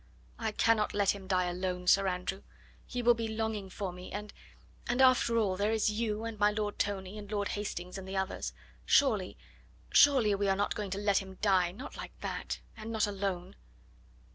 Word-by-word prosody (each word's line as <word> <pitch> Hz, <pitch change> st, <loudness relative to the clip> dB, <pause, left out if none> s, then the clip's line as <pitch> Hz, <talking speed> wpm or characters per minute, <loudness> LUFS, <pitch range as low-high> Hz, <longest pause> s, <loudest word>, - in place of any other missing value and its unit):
"I 220 Hz, -, -1 dB
cannot 215 Hz, -1 st, +2 dB
let 200 Hz, -1 st, +3 dB
him 195 Hz, -2 st, -10 dB
die 185 Hz, -1 st, +2 dB
alone, 180 Hz, 0 st, -3 dB
Sir 195 Hz, +2 st, +5 dB
Andrew; 185 Hz, +1 st, -2 dB, 0.5 s
he 245 Hz, 0 st, -3 dB
will 240 Hz, +1 st, +7 dB
be 230 Hz, -1 st, -3 dB
longing 220 Hz, -3 st, -3 dB
for 190 Hz, -1 st, -4 dB
me, 180 Hz, +1 st, -10 dB
and 210 Hz, +1 st, -6 dB, 0.5 s
and, 240 Hz, +2 st, 0 dB
after 255 Hz, -3 st, +5 dB
all, 200 Hz, -4 st, +2 dB
there 205 Hz, +2 st, +1 dB
is 220 Hz, -1 st, +2 dB
you, 215 Hz, 0 st, -2 dB
and 225 Hz, -2 st, -5 dB
my 205 Hz, 0 st, +5 dB
Lord 210 Hz, 0 st, -3 dB
Tony, 200 Hz, 0 st, -2 dB
and 205 Hz, 0 st, -10 dB
Lord 205 Hz, -1 st, -1 dB
Hastings 185 Hz, -2 st, -4 dB
and 190 Hz, -, -9 dB
the 190 Hz, 0 st, -4 dB
others; 190 Hz, -, -2 dB, 0.3 s
surely -, -, +3 dB, 0.5 s
surely 260 Hz, -8 st, +6 dB
we 200 Hz, 0 st, 0 dB
are 195 Hz, -, +3 dB
not 205 Hz, +1 st, 0 dB
going 210 Hz, -2 st, -4 dB
to 190 Hz, -, -3 dB
let 200 Hz, -1 st, +2 dB
him 190 Hz, -1 st, -9 dB
die, 185 Hz, -4 st, +3 dB
not 255 Hz, +10 st, -9 dB
like -, -, -9 dB
that, -, -, -4 dB
and 220 Hz, +1 st, -7 dB
not 220 Hz, -1 st, +2 dB
alone." 195 Hz, -3 st, -3 dB
205 Hz, 195 wpm, -31 LUFS, 190-215 Hz, 0.5 s, will